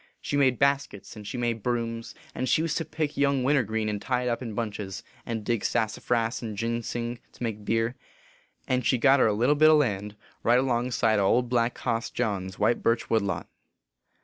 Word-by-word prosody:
She - - -3
made 130 -3 +3
baskets, 140 -7 0
and 105 -2 -9
she 125 - -4
made 120 -2 -1
brooms, 115 0 -3 0.2
and 130 0 -2
she 155 - +3
used 165 -2 -1
to 165 - -3
pick 155 -1 -3
young 140 -2 +2
wintergreen 110 -6 +1
and 105 -1 -2
tie 125 -1 0
it 125 - 0
up 120 - -1
in 115 -4 -5
bunches, 105 -4 -4 0.2
and 115 -2 -3
dig 115 -3 0
sassafras 115 +2 0
and 110 -3 -5
ginsing 115 +1 -3
to - - -8
make 110 -3 -3
beer; 115 +2 0 0.7
and 125 0 +1
she 125 - +2
got 135 +3 +5
her - - +5
a 105 - +2
little 120 +7 +3
bit 155 +1 +6
o 155 - +7
land, 105 -7 -1 0.3
right 120 +1 +4
alongside 120 -4 +1
o 100 - +2
Old 125 +3 +2
Black 120 -1 +1
Hoss 115 -2 -1
John 100 -6 -2
s 95 - -10
white 110 +3 +2
birch 115 0 0
wood 110 -1 +4
lot. 100 -1 -3
115 Hz, 205 wpm, -27 LUFS, 110-125 Hz, 0.7 s, o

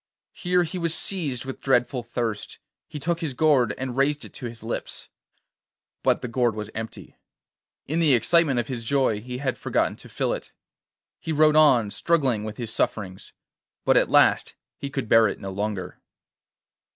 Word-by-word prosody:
Here 180 0 +1
he 175 +2 -5
was 170 -1 +2
seized 145 -11 -2
with 135 - -7
dreadful 125 -1 +1
thirst; 115 -2 -4 0.3
he - - -8
took 170 +3 -1
his 150 -6 -3
gourd 140 -5 +3
and 130 -2 -4
raised 145 +2 +1
it - - -13
to 125 - -6
his 115 -1 -9
lips. 115 - -5 0.9
But - - +1
the - - -2
gourd 120 -2 +1
was 105 0 -6
empty; 110 0 -8 0.7
in 160 +4 -1
the 155 -6 +5
excitement 140 +2 +3
of 120 - -2
his 125 -3 -5
joy 130 -4 +1
he 125 +2 -6
had 130 -1 -2
forgotten - - 0
to - - -14
fill - - -1
it. - - -7 0.7
He 165 - -4
rode 155 0 +4
on, 130 -9 +5
struggling 135 -10 +1
with 110 0 -6
his 115 -2 -4
sufferings, 95 -3 -2 0.5
but - - +4
at - - +4
last - - +4 0.2
he 140 - -6
could 135 -4 -4
bear 115 0 +6
it - - -4
no 95 - -6
longer. 100 0 -4
125 Hz, 175 wpm, -25 LUFS, 115-150 Hz, 0.9 s, bear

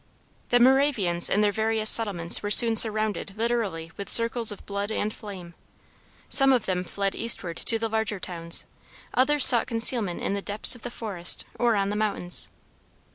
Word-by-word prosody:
The 245 - +1
Moravians 245 -9 +1
in 210 - -1
their 205 -1 0
various 220 +1 -3
settlements 195 -7 +5
were 205 - -6
soon 230 +1 +6
surrounded 215 -3 -1
literally 215 -8 -5
with 200 - -9
circles 230 -1 +1
of 205 - -13
blood 200 +1 -6
and 215 0 -5
flame. 185 -5 -12 0.7
Some 270 -1 +4
of 250 -5 -1
them 180 -1 -4
fled 195 +2 -5
eastward 190 -7 -2
to 230 - -1
the 225 0 -5
larger 220 -2 -5
towns; 170 -2 -6 0.5
others 285 +2 +5
sought 240 -2 +8
concealment 225 -5 -2
in - - -5
the 200 - -5
depths 205 +2 +3
of 245 - -11
the 245 - -8
forest 200 -7 -3
or 235 -2 -2
on 200 -1 -3
the - - -5
mountains. 205 -4 -4
215 Hz, 175 wpm, -23 LUFS, 195-230 Hz, 0.7 s, sought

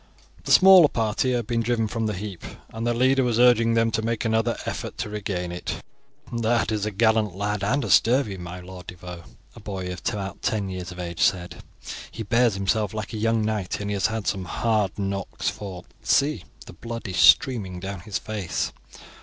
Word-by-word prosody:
The - - -2
smaller 185 -4 +9
party 115 0 0
had 120 - +1
just - - -20
been 120 -1 0
driven 115 -1 0
from 115 0 -2
the 105 - -2
heap, 95 -2 -7 0.3
and 115 +1 -3
their 120 - +2
leader 130 +2 +3
was 120 -3 +1
urging 115 -2 +5
them 115 0 +2
to 110 - 0
make 115 +1 -2
another 115 +1 +1
effort - - -5
to - - -3
regain 95 -4 -3
it. 90 - -5 0.5
"That 115 -1 +1
is 105 -1 -1
a - - +1
gallant 110 +1 +3
looking - - -10
lad, 105 0 -1
and 135 +8 +1
a - - -4
sturdy, 115 -4 +4
my 90 0 -8
Lord 90 -1 -11
de 90 - -7
Vaux," 90 -1 -10 0.3
a - - -11
boy 95 -4 -5
of 90 - -9
about 95 -2 -5
ten 105 -4 -1
years 95 0 -6
of 90 - -10
age 85 -1 -5
said. 85 -2 +1 0.5
"He 115 - -6
bears 115 0 +2
himself 100 +2 0
like 110 +1 -5
a - - -3
young 115 0 +1
knight, 105 -4 -2
and 105 0 -3
he - - 0
has 100 -2 +2
had 110 -2 -4
some 95 -2 -1
hard 105 -2 0
knocks, 100 -1 -2
for, 95 -4 -7 0.2
see, 145 +2 +1 0.2
the - - -11
blood 115 -2 -7
is 90 -2 -4
streaming 100 -9 +4
down 95 +1 -5
his 95 +3 -4
face. 105 -5 -3
105 Hz, 210 wpm, -24 LUFS, 95-115 Hz, 0.5 s, smaller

